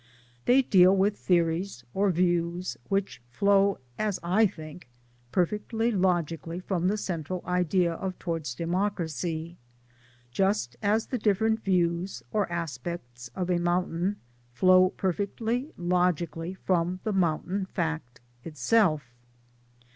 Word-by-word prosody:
They 265 +2 +5
deal 190 -4 +5
with 200 +2 +2
theories 170 -4 0
or 200 +1 +2
views 175 0 0
which 195 -9 -1
flow 200 +8 +3 0.2
(as 210 -3 0
I 200 +6 +4
think) 155 -5 -11 0.4
perfectly 210 +5 0
logically 175 -3 0
from 185 -1 -1
the 205 +3 +1
central 180 -2 -4
idea 180 -1 +1
of 185 +2 -4
Towards 165 -8 -3
Democracy 170 -2 -2 0.7
just 190 - 0
as 215 +2 +2
the 250 - -3
different 220 +2 +1
views 175 -1 0
or 205 -4 0
aspects 155 -7 -5
of 185 -1 -1
a 175 - +2
mountain 175 +2 0 0.4
flow 185 +4 +5
perfectly 220 - -2
logically 175 -1 0
from 180 -1 0
the 215 - -1
mountain 185 +2 0
fact 160 -10 -3 0.2
itself. 165 -1 +2
180 Hz, 115 wpm, -27 LUFS, 170-200 Hz, 0.7 s, They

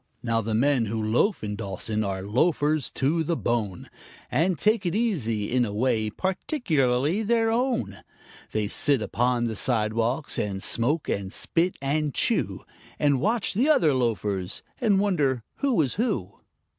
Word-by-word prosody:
Now, 115 -1 +1
the 110 0 -2
men 130 0 +2
who 110 +2 -2
loaf 110 - +1
in 105 -1 -3
Dawson 105 +1 -2
are 95 -2 -3
loafers 145 - +1
to 155 +5 +1
the 165 +1 -1
bone, 110 -6 -2 0.4
And 165 +6 +1
take 215 +5 +2
it 175 0 -1
easy 120 - 0
in 125 0 +3
a 110 - -2
way 110 0 0
peculiarly 160 - 0
their 225 +1 +2
own; 245 +1 -1 0.5
They 110 -1 -1
sit 140 +2 +2
upon 120 +3 0
the 115 -2 -2
sidewalks 115 +4 0
and 95 -2 -2
smoke 145 +7 +1
and 95 -1 -2
spit 175 - 0
and 145 0 -1
chew, - - 0 0.3
And 140 -3 +2
watch 225 +3 0
the 250 +10 +2
other 165 - +4
loafers, 105 -6 -1 0.2
and 210 -5 +3
wonder 145 - +1
who 275 -7 +1
is 130 - -2
who. 130 - -2
130 Hz, 155 wpm, -25 LUFS, 110-180 Hz, 0.5 s, other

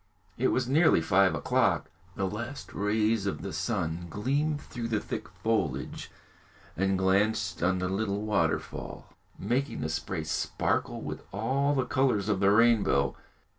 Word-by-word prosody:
It 130 - +1
was 125 -1 +1
nearly 155 - +5
five 95 +3 +3
o'clock. 80 - +1 0.2
The 100 - -1
last 120 +8 -6
rays 105 0 +1
of 100 - -3
the 95 - -5
sun 85 -6 -2
gleamed 140 - 0
through 120 -4 -6
the 110 -2 0
thick - - -5
foliage 75 - -2 0.7
and 95 +2 +1
glanced 95 -2 +1
on 95 +2 +2
the 90 0 -1
little 100 +1 -1
waterfall, 100 -7 -2 0.2
making 135 +3 -1
the 80 - -2
spray 80 +1 -3
sparkle 80 - -1
with - - -5
all 135 +8 +1
the 130 -2 +1
colours 130 -6 +1
of 100 -3 +1
the 100 0 +4
rainbow. 115 0 +4
105 Hz, 145 wpm, -29 LUFS, 95-120 Hz, 0.7 s, nearly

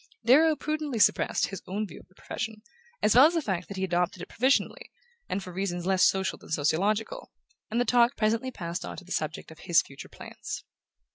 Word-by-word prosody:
Darrow 310 +6 +6
prudently 305 -3 -3
suppressed 215 - +3
his 195 -2 -7
own 205 +3 -2
view 195 - -11
of - - -18
the 185 - -28
profession, 215 +1 -6 0.4
as 210 - +4
well 260 +5 +8
as 340 - -2
the - - +3
fact 185 -5 -2
that 200 - -8
he 190 - -2
had 190 - -1
adopted 180 +1 0
it - - -8
provisionally, 260 +3 0 0.4
and 200 - -2
for 180 - -9
reasons 175 -2 -3
less 190 0 +2
social 190 0 +2
than - - -15
sociological; 195 - 0 0.4
and 230 - -1
the 245 - +2
talk 240 -1 +4
presently 225 +4 0
passed 170 -7 -5
on - - -7
to 185 - -10
the 185 - -14
subject 155 +1 -3
of 160 - -14
his 165 -1 +3
future 140 - -12
plans. - - -8
200 Hz, 215 wpm, -28 LUFS, 180-245 Hz, 0.4 s, well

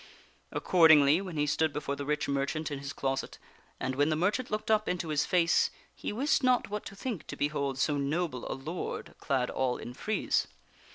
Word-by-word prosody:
Accordingly, 160 -2 +5
when 185 -5 -6
he 150 - +2
stood 155 +1 +1
before 145 -1 -3
the 140 0 -6
rich 150 0 0
merchant 140 +3 -1
in 140 - -3
his 140 0 -5
closet, 135 -3 -3 0.4
and 130 0 -2
when 145 +3 +2
the 155 - +2
merchant 205 +10 0
looked 215 +1 -2
up 215 - +6
^ing - - 0
Arthur - - +3
into 175 -2 -4
his 150 -1 +1
face, 170 -2 +3 0.2
he - - -5
wist 275 +8 +1
not 255 -5 +2
what 210 0 -3
to 200 - -10
think 215 - -5
to - - -6
behold 140 -2 -1
so 145 +2 +1
noble 140 -2 -1
a - - -5
seeks - - -4
armor - - -3
to - - -17
do 160 - -3
lord 180 - -5
clad 130 -2 0
all 130 -2 0
in 120 - -8
frieze. 215 +11 0
150 Hz, 230 wpm, -30 LUFS, 140-180 Hz, 0.4 s, up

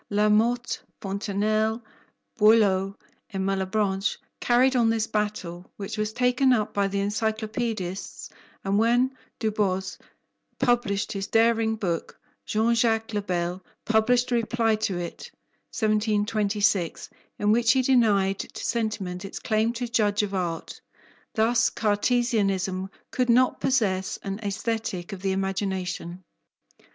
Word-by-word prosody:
La 210 +1 +2
Motte, 235 +3 +2 0.2
Fontenelle, 215 +3 0 0.6
Boileau, 200 -3 +4 0.3
and 190 -1 -3
Malebranche 195 +1 0 0.2
carried 255 +2 +3
on 235 -2 +4
this 225 -1 +1
battle, 210 -5 -3
which 205 +1 -5
was 215 -1 -1
taken 250 +2 +2
up 215 -4 +1
by 200 -1 +1
the 200 0 -2
Encyclopaedists, 215 -2 -3 0.3
and 200 +1 +1
when 245 +3 +2 0.2
Du 220 -1 -1
Bos 190 -3 -1 0.6
published 230 -4 +1
his 195 -1 -3
daring 225 -1 +3
book, 175 -6 -3 0.3
Jean 220 +2 +2
Jacques 225 -1 +1
le 205 - 0
Bel 180 -1 -2 0.2
published 240 +3 +2
a - - +3
reply 230 -1 +1
to 210 -4 -2
it 175 -1 -6 0.4
(1726), 210 -3 0 0.3
in 210 0 +2
which 230 +1 +4
he 260 -1 +2
denied 205 -7 +3
to - - -6
sentiment 210 -6 -2
its 195 - -7
claim 220 +1 +1
to 240 +1 -4
judge 210 -3 +1
of 200 -1 -3
art. 175 -3 -3 0.5
Thus 230 +2 +3
Cartesianism 205 -4 0 0.2
could 250 -1 0
not 250 +2 +3
possess 200 -8 +1
an 195 +1 -4
Aesthetic 205 -2 -3
of 190 - -7
the 195 0 0
imagination. 190 -2 -3
210 Hz, 125 wpm, -26 LUFS, 195-230 Hz, 0.6 s, Boileau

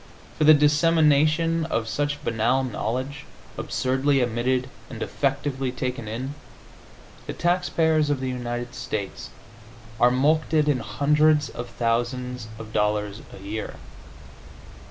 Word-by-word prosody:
For 155 - +1
the 155 0 +9
dissemination 155 +2 +3
of 115 -8 -2
such 145 +4 -2
banal 120 +4 +1
knowledge, 130 +4 -3 0.3
absurdly 135 +2 0
emitted 125 +1 0 0.2
and 115 - -8
defectively 135 0 -1
taken 125 -2 -4
in, 125 +6 -4 0.9
the - - -3
taxpayers 165 -3 +1
of 145 -2 0
the 130 0 -2
United 120 -1 -4
States 100 -3 -5 0.7
are 120 - +6
mulcted 150 +4 +2
in 145 -4 +2
hundreds 150 +6 +2
of 120 0 -7
thousands 120 +1 -2
of 110 -1 -10
dollars 105 0 0
a - - -11
year. 105 +2 -5
130 Hz, 115 wpm, -24 LUFS, 120-150 Hz, 0.9 s, the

